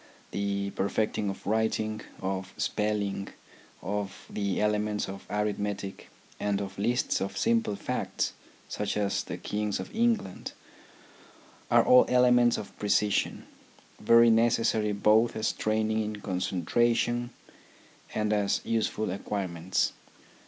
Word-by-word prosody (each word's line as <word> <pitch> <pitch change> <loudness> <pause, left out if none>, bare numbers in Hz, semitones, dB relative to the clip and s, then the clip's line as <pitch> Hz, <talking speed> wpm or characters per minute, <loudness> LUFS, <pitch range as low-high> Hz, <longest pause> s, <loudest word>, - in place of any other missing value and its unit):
The 100 0 -2
perfecting 105 +1 -1
of 95 - -7
writing, 110 0 0 0.2
of 95 0 -3
spelling, 105 -2 -1 0.6
of 100 +1 -4
the 100 -2 -1
elements 105 0 0
of 95 0 -8
arithmetic, 105 -1 -3 0.3
and 100 -1 0
of 95 -1 -6
lists 120 +4 +1
of 100 0 -3
simple 115 -1 +1
facts, - - -2 0.3
such 105 0 -2
as 100 -1 0
the - - -6
Kings 105 -1 -2
of 95 - -7
England, 225 - 0 1.2
are - - +6
all 125 0 +7
elements 125 -1 +5
of 105 - -8
precision, 105 0 +1 0.5
very 115 0 +6
necessary 115 -1 +2
both 105 +3 +3
as 110 0 0
training 110 0 0
in 105 0 -3
concentration 115 +6 0 0.9
and 105 0 +1
as 100 -1 +1
useful 110 -2 0
acquire 100 0 -3
ments. 85 +1 -1
105 Hz, 115 wpm, -28 LUFS, 100-110 Hz, 1.2 s, all